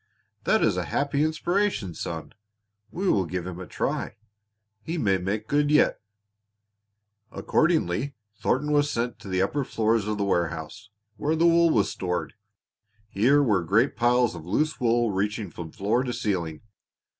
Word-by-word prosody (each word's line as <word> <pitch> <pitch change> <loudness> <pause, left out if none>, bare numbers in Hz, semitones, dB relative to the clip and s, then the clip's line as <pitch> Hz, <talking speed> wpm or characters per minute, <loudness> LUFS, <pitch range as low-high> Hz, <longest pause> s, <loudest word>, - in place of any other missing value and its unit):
That - - +3
is - - +2
a - - -1
happy 140 +1 0
inspiration, 160 - 0
son. 80 0 -6 0.6
We 190 +2 -3
will 95 - +2
give 90 0 -4
him 90 -1 -6
a 90 - -7
try. - - -3 0.7
He 165 +7 -4
may 100 - +2
make 105 +4 -3
good 145 0 +2
yet." 150 0 +3 1.3
Accordingly 140 - 0 0.2
Thornton 150 +7 0
was 145 0 +3
sent 120 -1 -2
to - - -11
the 95 0 +1
upper 140 +8 -1
floors 110 -3 0
of 105 0 -1
the 100 - 0
warehouse, 85 +4 -2 0.3
where 155 +2 0
the 165 +1 +2
wool 170 0 +5
was 105 -9 +2
stored. 90 -2 -3 0.8
Here 130 +9 +3
were 105 -8 +2
great 110 - +2
piles 120 0 +3
of 85 -3 -8
loose 150 - -1
wool 120 -2 +2
reaching 105 0 -2
from 80 0 -8
floor 105 +8 0
to 125 -2 -3
ceiling. 85 -9 -2
110 Hz, 155 wpm, -26 LUFS, 95-145 Hz, 1.3 s, wool